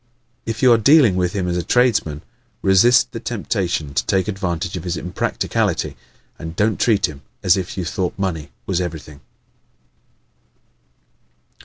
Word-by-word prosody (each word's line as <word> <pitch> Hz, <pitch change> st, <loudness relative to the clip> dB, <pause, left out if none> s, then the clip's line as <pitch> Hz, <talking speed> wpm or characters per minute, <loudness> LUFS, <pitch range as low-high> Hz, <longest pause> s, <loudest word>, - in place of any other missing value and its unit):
If 115 Hz, +2 st, -3 dB
you 125 Hz, -2 st, +7 dB
are 115 Hz, -, +3 dB
dealing 130 Hz, -, +5 dB
with 90 Hz, -1 st, 0 dB
him 95 Hz, -3 st, -1 dB
as 90 Hz, 0 st, -1 dB
a -, -, 0 dB
tradesman, 95 Hz, -, +1 dB, 0.4 s
resist 100 Hz, +6 st, +5 dB
the 115 Hz, -, -6 dB
temptation 95 Hz, -, -2 dB
to 65 Hz, -2 st, +1 dB
take 95 Hz, 0 st, +1 dB
advantage 95 Hz, -3 st, -3 dB
of 90 Hz, -, -5 dB
his 90 Hz, -1 st, -3 dB
impracticality 90 Hz, -, -2 dB, 0.4 s
and 80 Hz, 0 st, -7 dB
don't 105 Hz, +3 st, +1 dB
treat 105 Hz, -5 st, +3 dB
him 75 Hz, -4 st, -7 dB, 0.2 s
as 90 Hz, -, +5 dB
if 95 Hz, -1 st, -4 dB
you 90 Hz, -, -2 dB
thought 90 Hz, +1 st, -3 dB
money 85 Hz, -7 st, -3 dB, 0.2 s
was 95 Hz, -2 st, -1 dB
everything. 80 Hz, -4 st, -7 dB
95 Hz, 150 wpm, -20 LUFS, 85-105 Hz, 0.4 s, you